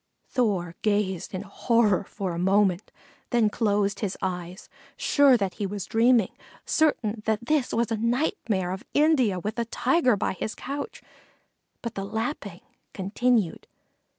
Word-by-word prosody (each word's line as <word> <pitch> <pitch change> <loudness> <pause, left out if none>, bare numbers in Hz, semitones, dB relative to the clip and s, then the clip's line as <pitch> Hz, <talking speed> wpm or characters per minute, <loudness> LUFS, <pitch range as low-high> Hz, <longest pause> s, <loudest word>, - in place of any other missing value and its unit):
Thor 195 -10 0
gazed 205 -4 0
in 185 0 -4
horror 210 -1 +2
for 190 -3 -4
a 170 - -4
moment, 190 0 +2 0.4
then 230 -4 +2
closed 205 -3 +1
his 205 -3 -3
eyes, 180 -1 -4 0.3
sure 285 - +5
that 195 -4 -2
he 205 -2 -3
was 200 0 -5
dreaming, 230 -2 +3 0.3
certain 235 -9 +1
that 220 +1 0
this 295 -2 +1
was 235 0 0
a 225 - +1
nightmare 230 - 0
of 190 +1 -5
India 275 - +3
with 215 +5 -4
a 235 - 0
Tiger 250 +2 +2
by - - -1
his 215 +4 -4
couch; 285 +1 -6 0.8
but 235 - -4
the 195 - -4
lapping 215 - -4 0.3
continued. 205 0 0
215 Hz, 145 wpm, -26 LUFS, 195-240 Hz, 0.8 s, sure